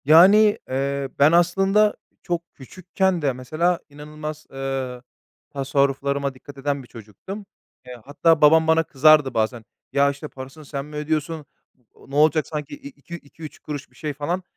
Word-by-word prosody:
Yani, 195 +8 +7
eee, 140 +1 -2
ben 145 +2 +6
aslında 195 +5 +3 0.3
çok 170 -1 -4
küçükken 185 +5 -2
de 140 -3 +1
mesela 155 +8 -1
inanılmaz, 150 +1 -8
eee, 135 -2 -4 0.5
tasarruflarıma 140 0 0
dikkat 140 +2 -14
eden 140 0 -2
bir - - -16
çocuktum. 115 - -10 0.4
Eee, 125 - -8
hatta 160 +3 +2
babam 160 +2 +6
bana 160 0 +4
kızardı 150 -1 +4
bazen, 110 +1 -1 0.3
“Ya, 140 0 +4
işte, 140 +2 -8
parasını 135 +3 -11
sen 140 -1 -5
mi 150 0 -11
ödüyorsun? 155 0 -2 0.6
Ne 140 - -8
olacak 155 +1 +3
sanki? 150 - -5
İ 280 -1 -11
iki 215 -10 -11
iki 160 0 -14
üç 155 - -9
kuruş 145 -2 -7
bir - - -26
şey.” 150 +2 -4
falan. 170 +6 -3
150 Hz, 155 wpm, -22 LUFS, 140-165 Hz, 0.6 s, Yani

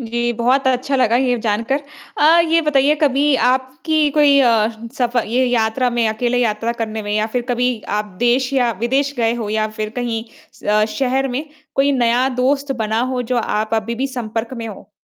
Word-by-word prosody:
जी, 240 0 -2
बहुत 250 +4 +1
अच्छा 260 +2 0
लगा 240 -2 +3
ये 250 -1 +1
जानकर 230 +6 0 0.4
अ, 320 +3 +5
ये 330 +1 +3
बताइए 290 -1 +3
कभी 290 -1 +2
आपकी 265 +4 0
कोई 290 -1 +4
अ, 230 -4 +3 0.3
सफ़र 245 -2 +1
ये 245 +4 +1
यात्रा 245 +1 +1
में 235 -1 +1
अकेले 240 +3 -1
यात्रा 230 -1 0
करने 220 -2 -4
में 205 - -5
या 215 0 +1
फ़िर 250 - 0
कभी 245 -1 0 0.2
आप 210 - -1
देश 245 +2 +1
या 250 -3 +2
विदेश 270 +4 0
गए 230 -1 +1
हो 230 -3 -4
या 215 0 0
फ़िर 215 0 -5
कहीं 235 -2 -2 0.3
स - - -19
अ, 210 0 +3
शहर 265 +2 -1
में 260 +4 -3 0.3
कोई 280 +1 +2
नया 245 0 +2
दोस्त 275 +2 +1
बना 220 +1 0
हो 250 -1 -1
जो - - +1
आप 220 -1 -1
अभी 225 +1 -2
भी 260 +4 -2
संपर्क 235 -2 -4
में 230 - -5
हो? 210 - -11
245 Hz, 195 wpm, -18 LUFS, 225-265 Hz, 0.4 s, अ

